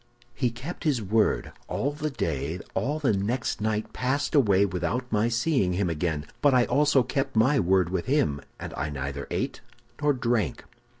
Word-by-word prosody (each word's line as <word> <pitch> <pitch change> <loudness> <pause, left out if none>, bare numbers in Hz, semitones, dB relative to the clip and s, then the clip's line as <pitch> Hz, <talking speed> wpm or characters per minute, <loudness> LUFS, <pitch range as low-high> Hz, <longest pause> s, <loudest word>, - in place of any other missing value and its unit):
"He 125 0 0
kept 125 +9 -7
his 145 -6 +2
word. 110 +1 +1 0.2
All 140 - -1
the 150 +1 -3
day, 80 - -2
all 145 +4 0
the 140 -8 +1
next 110 +4 -1
night 110 0 -1
passed 130 +3 -1
away 100 -9 +4
without 100 +7 -2
my 110 +1 +2
seeing 115 - +1
him 90 -1 0
again. 80 -2 -2 0.2
But 145 -3 +5
I 125 -1 +5
also 145 -2 +3
kept 135 0 -2
my 130 +6 +4
word 95 -1 +3
with 95 -2 -2
him, 130 - +1 0.2
and - - -6
I 70 +2 -2
neither 70 0 -4
ate - - -2 0.4
nor 145 -1 +3
drank. 115 - -1
115 Hz, 175 wpm, -27 LUFS, 90-135 Hz, 0.4 s, But